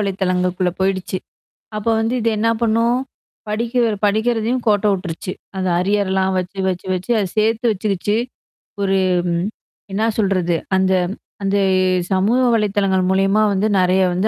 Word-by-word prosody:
வலைதளங்களுக்குள்ள 185 -2 0
போயிடுச்சு. 190 -1 -1 0.6
அப்ப 210 - -5
வந்து 225 +3 0
இது 230 - +1
என்ன 230 +1 +2
பண்ணும்? 230 +2 +2 0.5
படிக்க 230 +3 -1 0.2
படிக்கிறதையும் 225 +3 +1
கோட்ட 210 -1 +3
விட்டுருச்சு. 180 -1 -4 0.2
அந்த 185 -1 -1
அரியர்லாம் 190 -1 +1
வச்சு, 185 +2 -5
வச்சு, 185 0 -3
வச்சு 185 +5 -5
அத 195 -3 0
சேர்த்து 225 +2 +2
வச்சுக்கிச்சு. 205 0 -1 0.7
ஒரு 195 0 +2 1.0
என்ன 220 +3 +1
சொல்றது? 185 -4 +1 0.2
அந்த 190 0 +2 0.5
அந்த 195 +1 +1 0.5
சமூக 200 +6 +2
வலைதளங்கள் 200 -4 +1
மூலியமா 195 +2 +2
வந்து 200 +2 +1
நெறைய 185 +1 +3
வந்து 185 +4 +1
195 Hz, 125 wpm, -19 LUFS, 185-220 Hz, 1.0 s, கோட்ட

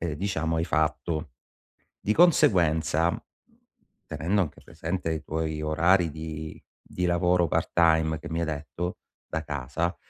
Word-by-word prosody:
diciamo, 80 -2 -1
hai 80 - +1
fatto. 80 -1 -1 0.7
Di 105 - +1
conseguenza, 85 - +4 1.0
tenendo 95 +5 0
anche 75 - -6
presente 85 0 -4
i 80 0 -3
tuoi 80 0 -3
orari 85 +3 +3
di 80 0 -7 0.2
di 90 - -2
lavoro 90 0 +3
part - - 0
time, 80 -2 +3
che 80 +1 -8
mi 85 0 -2
hai - - +1
detto, 80 +3 -4 0.3
da 80 - -3
casa, 75 +4 -2
80 Hz, 130 wpm, -27 LUFS, 80-90 Hz, 1.0 s, conseguenza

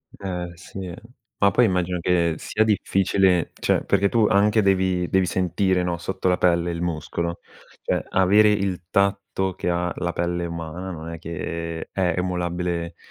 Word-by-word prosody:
Eh, 90 -3 -5
sì, 95 +2 -8
eh. 90 0 -8 0.4
Ma, 100 -1 +5
poi, 125 - +4
immagino 90 -2 0
che 85 -1 +1
sia 110 - 0
difficile, 95 -4 +2
cioè, - - +1
perché 100 0 +2
tu, 115 -2 +3
anche, 105 +1 +4
devi 95 -2 +2
devi 95 -1 +3
sentire, 90 +1 +1
no, 90 -1 -1
sotto 95 +2 -3
la 90 - +2
pelle 85 -1 +2
il 85 0 -4
muscolo. 85 0 -3 0.4
Cioè, - - 0
avere 100 +3 +5
il 95 -3 0
tatto 100 -1 0
che 90 - -3
ha 85 0 0
la 85 -1 -2
pelle 85 0 -1
umana 85 +2 -6
non 80 -1 -7
è 85 -1 -7
che 85 0 -5
è 90 -3 +1
emulabile, 90 -1 -2
90 Hz, 165 wpm, -23 LUFS, 85-95 Hz, 0.4 s, Ma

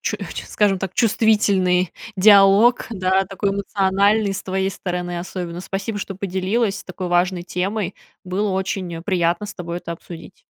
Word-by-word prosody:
чу - - -2
чу - - -7
скажем 200 -2 +2
так, 190 -1 -3
чувствительный 200 -5 +2 0.2
диалог, 200 +4 +6
да, 190 -2 +1
такой 195 +1 -2
эмоциональный 200 +1 +1
с 190 - -5
твоей 190 0 -1
стороны 180 -2 -4
особенно! 175 -1 -6
Спасибо, 200 +3 -4
что 195 -2 -6
поделилась 195 +3 -1
такой 185 0 -6
важной 175 0 +1
темой! 195 +2 -2 0.3
Было 195 +3 -1
очень, 190 -1 -2
э, 165 - -7
приятно 175 +1 0
с - - -8
тобой 170 -1 -5
это 170 -1 -5
обсудить! 170 +1 -11
190 Hz, 155 wpm, -21 LUFS, 180-200 Hz, 0.3 s, диалог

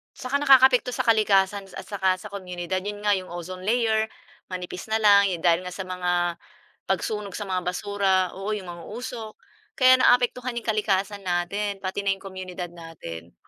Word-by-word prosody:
Saka 275 +2 -2
nakakaapekto 265 -3 +5
sa 255 - 0
kalikasan, 200 -3 +3
at - - -6
saka 190 -3 0
sa 200 +2 -11
komunidad, 185 -1 -4
'yon 205 +2 -6
nga, 210 - +3
'yong 185 -2 0
ozone 185 +2 -7
layer 220 -2 +2 0.4
manipis 180 +1 -6
na 220 - 0
lang 205 -2 +6
yo 185 - -1
dahil 170 -1 +4
nga 180 - -6
sa 190 - -4
mga, 180 -2 -1 0.5
pagsunog 210 -3 -2
sa 205 - -4
mga 185 -2 -2
basura 190 -1 +1
oo, 200 +3 -3
'yong 205 - -6
mga 170 -1 -10
usok, 235 -2 -6 0.4
kaya 255 0 +6
naaapektuhan 245 0 +3
'yong 235 - -4
kalikasan 205 -1 0
natin, 195 +2 -2
pati 190 +1 -3
na 195 -1 +1
'yong 195 - -18
komunidad 185 -2 -6
natin. 145 - -10
195 Hz, 175 wpm, -25 LUFS, 180-215 Hz, 0.5 s, lang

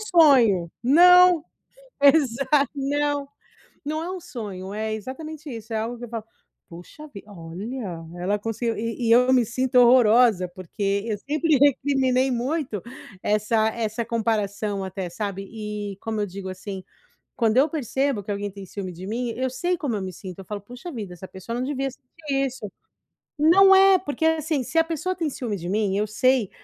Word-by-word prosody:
sonho, 265 - +4
não. 355 +4 +6 0.6
Exa 275 -3 +4 0.3
não. 285 0 -1 0.6
Não 310 +2 -3
é 355 - -4
um 375 -1 -5
sonho, 205 - -7
é 215 0 -2
exatamente 300 +7 -8
isso, 225 0 -9
é 220 - -1
algo 230 +2 -3
que 245 - -8
eu 240 - -8
falo: 225 -2 -5 0.4
"Poxa 180 - -12
vi 200 - -9
olha, 190 +2 -7 0.2
ela 200 +4 0
conseguiu", 225 +2 -3
e 230 +1 -3
e - - +2
eu 250 +2 +5
me 250 -2 +4
sinto 255 +2 -2
horrorosa, 235 -5 +5
porque 195 +3 -3
eu 215 -2 -2
sempre 305 +5 +1
recriminei 265 -2 +2
muito 250 - -2 0.4
essa 215 +1 +1
essa 225 0 -3
comparação 215 -3 -1
até, 190 -1 -5
sabe, 195 +1 -5
e 210 -2 -6
como 220 -1 -3
eu 205 - 0
digo 190 0 -7
assim, 190 +1 -7 0.5
quando 225 -1 +1
eu 275 +4 +5
percebo 270 -5 -1
que 205 - -5
alguém 200 0 -3
tem 195 0 -10
ciúme 185 0 -6
de 180 +2 -9
mim, 240 +3 -2
eu 260 +1 -1
sei 350 +8 -1
como 260 -8 -2
eu 200 - -3
me 185 -1 -5
sinto, 185 +1 -9
eu 190 - -9
falo: 205 -1 -6
"Poxa 245 - -9
vida, 205 -8 -6
essa 185 +2 -10
pessoa 190 +5 -7
não 255 - -1
devia 270 -1 -2
sentir 275 +2 -4
isso". 245 -6 -6 0.7
Não 385 +5 +7
é, 385 0 +7
porque 320 -2 -3
assim, 315 -3 +1
se 265 +7 -5
a 325 - +6
pessoa 335 +3 -3
tem 330 -4 -2
ciúme 240 -6 -4
de 175 -1 -6
mim, 205 -1 0
eu 210 +1 +1
sei, 250 0 +1
235 Hz, 180 wpm, -24 LUFS, 205-280 Hz, 0.7 s, Não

